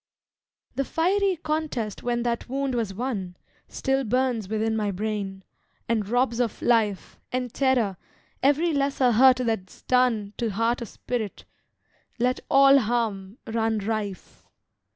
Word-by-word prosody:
The 275 - 0
fiery 380 +6 +1
contest 300 -9 -2
when 240 -1 -1
that 235 0 -2
wound 270 0 -1
was 230 -5 -1
won, 195 -5 -4 0.3
Still 270 0 -1
burns 245 -3 0
within 220 +1 0
my 210 -2 0
brain, 200 -1 -3 0.4
and 220 -3 0
robs 245 0 +1
of 240 -3 -1
life, 220 -5 +1
And 250 -2 -2
terror, 245 -8 +1 0.4
every 300 +5 +3
lesser 275 -3 +2
hurt 255 +3 +6
that's 225 -7 -3
done 235 -5 +2
To 235 - -1
heart 230 +4 0
or - - -3
spirit; 220 -1 -5 0.7
let 250 +1 +1
all 275 0 +7
harm 220 -4 -2
run 225 -1 0
rife. 210 -2 -4
235 Hz, 130 wpm, -25 LUFS, 215-260 Hz, 0.7 s, all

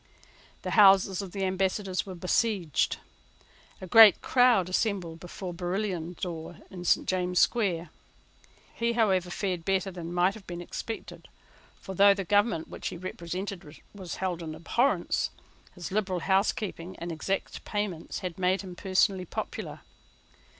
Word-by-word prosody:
The - - -3
houses 195 -2 +6
of 195 -2 -7
the 195 0 -3
Ambassadors 190 +1 -1
were 190 - -6
besieged. 180 - 0 0.8
A - - -7
great 215 +1 +8
crowd 245 -8 +4
assembled 185 -4 -1
before 180 +1 -7
Barillon's 180 -1 -3
door 170 -3 -5
in 180 -1 -8
St. - - +3
James's 180 -1 +2
Square. 175 -8 0 0.8
He, 235 0 0
however, 190 -6 +2
fared 180 -2 -2
better 195 +1 0
than 175 -2 -7
might 180 +2 +2
have 210 -2 -13
been 175 -1 -6
expected. 220 +5 -7 0.5
For, 190 - -7
though 200 +1 +6
the 195 - -3
government 205 -3 +2
which - - -6
he - - -5
represented 175 -2 -6
was 190 -4 -7
held 180 -3 -2
in 155 -2 -6
abhorrence, 235 - +1 0.5
his 180 -1 -7
liberal 190 -3 -1
housekeeping 190 -2 0
and 170 +1 -5
exact 190 +4 -3
payments 205 -6 -3
had 180 -1 -5
made 185 +2 +1
him 180 -2 -8
personally 190 0 +1
popular. - - -5
185 Hz, 145 wpm, -28 LUFS, 175-200 Hz, 0.8 s, great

